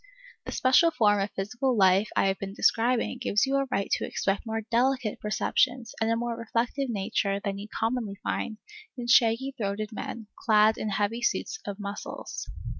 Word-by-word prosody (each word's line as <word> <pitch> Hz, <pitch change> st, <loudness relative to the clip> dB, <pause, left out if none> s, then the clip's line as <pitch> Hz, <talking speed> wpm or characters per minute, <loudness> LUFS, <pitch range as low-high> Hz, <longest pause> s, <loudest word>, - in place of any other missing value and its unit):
The -, -, -5 dB
special 265 Hz, +6 st, +4 dB
form 210 Hz, -8 st, +3 dB
of 195 Hz, +1 st, -1 dB
physical 240 Hz, +6 st, -1 dB
life 195 Hz, +1 st, +4 dB
I -, -, +3 dB
have 195 Hz, 0 st, 0 dB
been 195 Hz, 0 st, -6 dB
describing 240 Hz, +3 st, +2 dB
gives 210 Hz, -2 st, +2 dB
you 270 Hz, +1 st, +1 dB
a 275 Hz, 0 st, 0 dB
right 200 Hz, -6 st, 0 dB
to -, -, +1 dB
expect 195 Hz, +3 st, -1 dB
more 225 Hz, 0 st, -2 dB
delicate 240 Hz, 0 st, 0 dB
perceptions 240 Hz, +3 st, 0 dB
and 220 Hz, -, +2 dB
a 230 Hz, -, +2 dB
more 235 Hz, 0 st, -2 dB
reflective, 235 Hz, +4 st, -2 dB
nature 200 Hz, -2 st, -1 dB
than 200 Hz, 0 st, -4 dB
you 205 Hz, -, -7 dB
commonly 225 Hz, -2 st, -2 dB
find 220 Hz, -, -2 dB, 0.4 s
in 245 Hz, -, -4 dB
shaggy 235 Hz, +3 st, +4 dB
throated 210 Hz, -1 st, -3 dB
men, 220 Hz, +1 st, -6 dB
clad 215 Hz, -1 st, +4 dB
in 215 Hz, -, -2 dB
heavy 205 Hz, +4 st, -1 dB
suits 440 Hz, -, -1 dB
of 200 Hz, -1 st, -4 dB
muscles. 205 Hz, -, -6 dB
225 Hz, 180 wpm, -27 LUFS, 205-245 Hz, 0.4 s, special